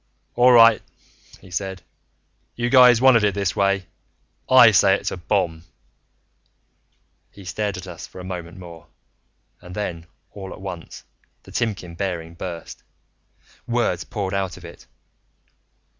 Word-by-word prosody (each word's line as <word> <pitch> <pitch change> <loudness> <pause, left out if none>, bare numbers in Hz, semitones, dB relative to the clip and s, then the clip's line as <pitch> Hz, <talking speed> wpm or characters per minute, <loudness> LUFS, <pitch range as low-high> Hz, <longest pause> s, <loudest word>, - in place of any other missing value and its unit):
"All 125 +1 +5
right," 115 -2 +7 0.6
he 95 - -16
said. 95 +1 -4 0.7
"You 120 0 -2
guys 125 -3 +7
wanted 125 -5 +6
it 100 -2 +1
this 100 -2 -1
way. 100 -1 +1 0.6
I 125 -3 +8
say 95 -1 +4
it's - - -4
a - - -5
bomb." 85 -3 -1 1.7
He 100 - -15
stared 100 +1 -3
at 90 - -8
us 90 -3 -9
for - - -13
a - - -8
moment 90 -2 -7
more 85 -3 -12 0.7
and 90 0 -11
then, 85 -5 -5 0.2
all 95 -2 -9
at - - -12
once, 90 -3 -8 0.4
the - - -15
Timkin 100 -7 -3
bearing 85 -3 -4
burst. 85 -1 -8 0.9
Words 120 -7 0
poured 100 -3 -4
out 95 -2 -2
of 90 - -13
it. 85 - -13
95 Hz, 140 wpm, -22 LUFS, 90-105 Hz, 1.7 s, I